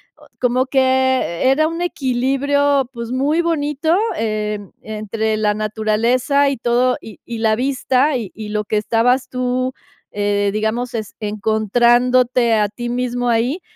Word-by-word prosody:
Oh, - - -20
como 250 +1 +1
que 260 -5 +2
era 310 +4 +3
un 330 +2 -4
equilibrio, 275 -1 +1
pues, 235 0 -6
muy 285 +6 +1
bonito 315 0 0 0.2
e 215 -1 -2 0.2
entre 220 0 -2
la 210 -1 +1
naturaleza 225 +6 +1
y 275 - -3
todo 245 +2 +2
y 220 - -12
y 235 -1 -6
la 220 -1 +2
vista 265 +2 +1
y 220 -6 -6
y 215 -1 -7
lo 210 0 -2
que 215 - -1
estabas 235 +4 +1
tú, 255 0 -1 0.4
eh, 205 0 0
digamos, 220 +3 -1 0.3
encontrándote 235 +3 +2
a 210 -2 +2
ti 240 +3 -6
mismo 245 0 -1
ahí. 240 +9 0
245 Hz, 140 wpm, -19 LUFS, 220-260 Hz, 0.4 s, era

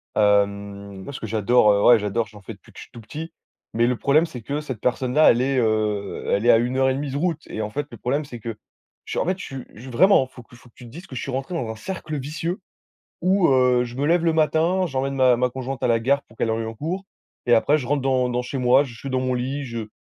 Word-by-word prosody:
hem, 100 -1 0
moi - - -7
ce - - -6
que 110 - -5
j'adore, 110 +1 +4
heu 100 0 +1
ouais, 120 -2 +7
j'adore, 105 +3 -1
j'en 105 -2 -15
fais 95 - -8
depuis - - -19
que - - -19
je - - -8
suis - - -19
tout 120 - -11
petit 155 +9 -8 0.4
mais 120 +1 +2
le 125 - 0
problème 150 +6 +3
c'est 130 -8 -9
que 145 +6 -3
cette 130 -7 -6
personne-là, 125 +4 +3
elle 120 - +1
est, 135 +1 0
heu, 110 -3 0
elle 100 +3 +1
est 120 - +7
à - - +6
1 120 +3 -1
heure 130 0 +3
et 130 - +1
demie 140 +1 -3
de 140 - -3
route 165 0 -1
et 110 - -5
en 105 - -3
fait 145 +5 -3
le 120 - -9
problème 130 +8 -1
c'est 120 -4 -9
que 115 0 -6 0.5
je - - -3
en - - 0
fait, 185 +1 0
je - - -8 0.4
suis 130 +3 -9
vraiment, 175 - +5
il - - -28
faut 125 - -12
il - - -13
faut 120 - -19
que - - -35
tu 125 - -13
te - - -11
dises 170 +10 -11
que 130 - -10
je 120 - -3
suis 135 - -5
rentré 135 +6 -4
dans 125 -9 -3
un 110 - -5
cercle 155 +4 -5
vicieux 160 +6 -4 0.6
où 185 0 +3
heu, 125 -2 +4
je 120 0 -8
me 140 - -1
lève 170 +1 +3
le 165 - +3
matin, 160 +4 +2
j'emmène 135 -2 -2
ma 130 -2 +4
ma 125 +1 +1
conjointe 130 +1 -6
à - - +2
la 115 -1 +3
gare 140 +4 +1
pour 115 - -21
qu'elle 115 - 0
arrive 110 0 -2
en 115 - -7
cours 170 - -4 0.4
et 120 - +5
après 145 +6 +3
je 130 - -5
rentre 140 +1 0
dans 130 -2 +1
dans 125 0 -1
chez 130 +2 -5
moi, 125 +2 +4
je 125 -4 -10
suis 140 - -7
dans 130 0 0
mon 130 0 -1
lit, 135 +3 -3
je 115 -3 -5
125 Hz, 290 wpm, -23 LUFS, 115-145 Hz, 0.6 s, ouais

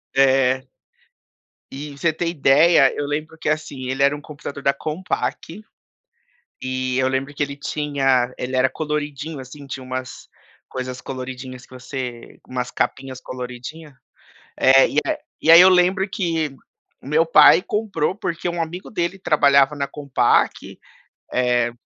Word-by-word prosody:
É. 130 -1 +3 1.0
E, 145 +2 -7
você 160 +3 +1
ter 165 +2 -3
ideia, 145 -1 +5
eu 145 - -2
lembro 155 +2 -4
que 160 - -6
assim, 140 -4 -2
ele 135 +1 -2
era 140 +1 +4
um 145 - -9
computador 145 -2 -9
da 140 - +3
Compaq, 165 +4 -4 1.0
e 130 0 -2
eu 130 - +2
lembro 135 +2 -2
que 145 - -6
ele 140 0 -1
tinha 135 -4 0
ele 130 +1 -4
era 130 +1 +3
coloridinho 150 -1 -4
assim, 140 +2 -10
tinha 135 -1 -7
umas 130 0 -7 0.4
coisas 130 -1 -6
coloridinhas 130 -1 -7
que - - -18
você 125 -2 -7
umas 125 -1 -3
capinhas 130 -1 -3
coloridinha, 130 +4 -8 0.6
eh, 135 0 +6 0.5
e 160 - 0
aí 170 +2 +11
eu 185 - +8
lembro 185 +2 +3
que 165 -7 -2 0.5
o - - -13
meu 160 +3 +3
pai 165 - +7
comprou, 200 -6 -1
porque 170 -3 -4
um 170 -1 -2
amigo 170 +3 -6
dele 175 -1 -2
trabalhava 140 -5 +3
na 140 -1 -2
Compaq, 140 -5 0 0.5
eh 120 -1 +1
140 Hz, 145 wpm, -21 LUFS, 130-160 Hz, 1.0 s, aí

